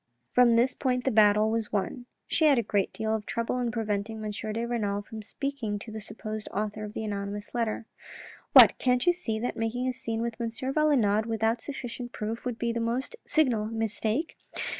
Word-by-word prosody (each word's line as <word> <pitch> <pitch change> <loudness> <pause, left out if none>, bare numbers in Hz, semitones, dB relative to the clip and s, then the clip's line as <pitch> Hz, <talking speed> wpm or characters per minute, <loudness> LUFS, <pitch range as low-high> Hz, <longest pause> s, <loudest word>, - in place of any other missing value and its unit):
From 245 -2 +5
this 245 +2 +3
point 250 -2 0
the 265 - +2
battle 215 0 +5
was 225 -1 -1
won. 215 +5 -2 0.2
She 320 - +2
had 290 -3 +6
a 235 - +2
great 205 -2 0
deal 220 0 -2
of 215 -1 -3
trouble 235 +2 -1
in 245 -1 0
preventing 220 -2 -2
M. 210 - -2
de 215 +2 -3
Renal 205 -4 -1
from 220 - -9
going - - -5
to 210 - -18
speak 280 0 -4 0.2
to 220 +1 -9
the 220 0 -6
supposed 215 0 -6
author 215 +1 -3
of 210 - -8
the 220 - -4
anonymous 205 0 -4
letter. 230 -2 -1 0.3
" - - -17
What, - - +9
can't 250 -1 +2
you 350 - +5
see 230 -11 -3
that 240 +3 -2
making 230 +3 -1
a 255 - 0
scene 230 -2 -3
with 235 0 -4
M. 230 - 0
Valenod 245 -4 +2
without 225 +1 0
sufficient 245 -3 -6
proof 220 +3 -4
would 245 -2 -2
be 235 0 -1
the 235 - -1
most 235 - -2
signal 250 -9 +2
mistake? 225 - -2
225 Hz, 210 wpm, -28 LUFS, 215-245 Hz, 0.3 s, What